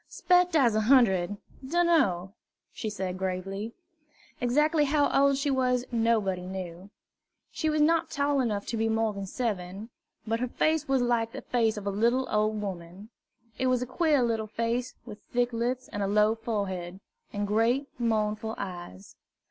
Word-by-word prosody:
"'Spect 360 -1 +2
I's 250 -7 +4
a 215 - +2
hundred, 205 -6 +3 0.3
dunno," 265 - +2 0.4
she 220 - -4
said 190 -3 -4
gravely. 195 +4 -4 0.6
Exactly 300 +5 +2
how 290 0 +2
old 275 0 +4
she 280 +1 0
was 250 -2 +1
nobody 215 -6 +1
knew. 185 0 -7 0.6
She 315 - -1
was 305 0 +1
not 330 +1 +2
tall 280 -1 +1
enough 210 -5 -1
to 230 - -3
be 225 0 +1
more 225 -1 +1
than 200 -1 -6
seven, 205 -1 -4 0.3
but 225 +1 -1
her 250 - -1
face 310 +4 0
was 270 -2 +2
like 230 -2 0
the - - -7
face 225 -3 +1
of 205 - -6
a 200 - 0
little 235 +6 +1
old 215 0 +1
woman. 190 0 -7 0.5
It 260 - +1
was 250 -1 +2
a - - -3
queer 285 +1 +2
little 225 -2 -1
face, 230 +3 -2
with 210 0 -10
thick 245 0 +1
lips 245 +2 -2
and 205 - -4
low 210 +1 +4
forehead, 195 -5 -4 0.3
and 205 0 -2
great 230 +7 +1
mournful 220 -1 -1
eyes. 175 - -8
225 Hz, 165 wpm, -28 LUFS, 200-255 Hz, 0.6 s, I's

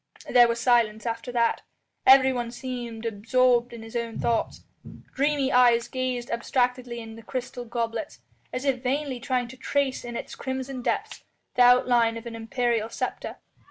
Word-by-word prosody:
There 240 -1 +6
was 235 0 -1
silence 230 -3 +2
after 230 +1 -3
that. 235 -1 +1 0.5
Everyone 260 -2 +5
seemed 240 -2 -6
absorbed 240 +3 +2
in 235 -1 -9
his 225 +1 -11
own 235 -1 -3
thoughts. 230 -1 -1 0.5
Dreamy 280 -1 +1
eyes 240 -2 +5
gazed 255 -2 -3
abstractedly 245 0 -1
in 225 0 -9
crystal 245 +1 -5
goblets, 235 +5 -3 0.3
as 255 +2 -4
if 265 -3 +1
vainly 265 0 -1
trying 250 0 -1
to 260 - -11
trace 275 0 -1
in 240 -1 -7
its - - -6
crimson 260 0 -5
depths - - -2 0.3
the 250 - +2
outline 245 -2 +5
of 230 - -9
an 235 -1 -6
imperial 230 0 -1
sceptre. - - -4
245 Hz, 155 wpm, -26 LUFS, 230-255 Hz, 0.5 s, There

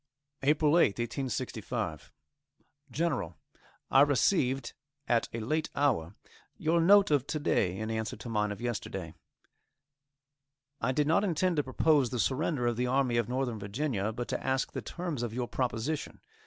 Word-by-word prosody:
APRIL 150 +2 +3
8th, 150 - +4
1865. 120 +1 -3 0.8
GENERAL: 135 - -2 0.5
I 135 - +7
received, 135 -1 +2 0.3
at 120 -1 +2
a 115 - -4
late 155 +8 -1
hour, 105 - +1 0.4
your 165 +2 +2
note 200 +1 +6
of 145 -3 +2
to 155 - -2
day, 95 -10 +1
in 110 +1 -3
answer 110 0 -2
to - - -10
mine 105 -2 0
of 100 - -6
yesterday. 120 -3 -4 1.7
I 125 - +1
did 145 +3 +1
not 160 +6 +3
intend 180 -2 +1
to 145 - +2
propose 135 0 +2
the 125 - -3
surrender 130 +2 0
of 120 -1 0
the 125 +1 0
Army 130 -2 +1
of 120 -1 0
Northern 125 -3 -1
Virginia, 105 0 -2
but 120 +2 -5
to - - -3
ask 130 0 0
the - - -4
terms 170 -7 -4
of 120 -2 -3
your 125 -1 -2
proposition. 130 +5 -2
130 Hz, 155 wpm, -30 LUFS, 115-150 Hz, 1.7 s, I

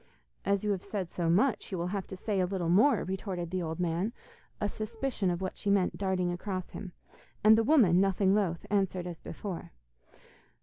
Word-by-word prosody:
'As 200 0 +1
you 210 - +1
have 190 -3 -1
said 195 -5 -4
so 170 -2 -1
much 210 +9 +2
you 190 - -2
will 170 - -1
have 195 -2 -3
to - - -7
say 200 +1 -1
a 180 - +2
little 180 -3 -2
more,' 215 +6 +5
retorted 185 -2 -4
the 185 -1 -1
old 160 -1 -4
man, 180 +5 0 0.5
a 210 - 0
suspicion 220 -1 -2
of 175 +1 -2
what 185 - -3
she 205 - -2
meant 200 -2 +2
darting 185 -2 0
across 185 0 -4
him; 185 -3 -7 0.5
and 215 +1 +8
the 225 - +3
woman, 215 - +5
nothing 195 0 +3
loth, 185 -5 0
answered 190 -3 +1
as 175 -2 -6
before. 180 - -6
190 Hz, 200 wpm, -30 LUFS, 175-205 Hz, 0.5 s, and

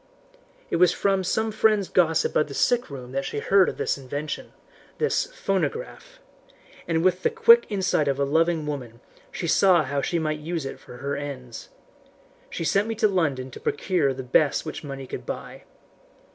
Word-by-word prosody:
"It - - +1
was 180 +1 +5
from 195 -1 +1
some 220 +4 0
friend's 215 -2 +2
gossip 165 -3 +2
of 150 - +3
the 140 - -8
sick 245 0 +1
room 130 -3 -8
that 135 +1 -2
she 135 - -5
heard 190 +6 +4
of - - -7
this - - -1
invention 145 +3 -5 0.5
this 455 - 0
phonograph - - -3 0.7
and 165 -1 +1
with 185 0 +2
the - - +2
quick 465 +1 +6
insight 190 -7 +1
of 140 0 0
a - - +2
loving 160 +2 +1
woman 125 -6 -6 0.3
she - - -5
saw 175 +1 +4
how 140 0 -2
she 170 - -1
might 155 -2 -1
use 160 -1 -4
it 135 - -6
for 125 - -12
her 140 +2 -3
ends. 135 -4 -7 0.8
She - - -4
sent 200 +6 +2
me 225 - -3
to 220 0 +3
London 145 -10 -1
to - - -10
procure 155 -3 0
the 130 0 -5
best 140 +5 +2
which 155 - -6
money 135 -2 -7
could - - -7
buy. - - -7
160 Hz, 185 wpm, -25 LUFS, 140-195 Hz, 0.8 s, quick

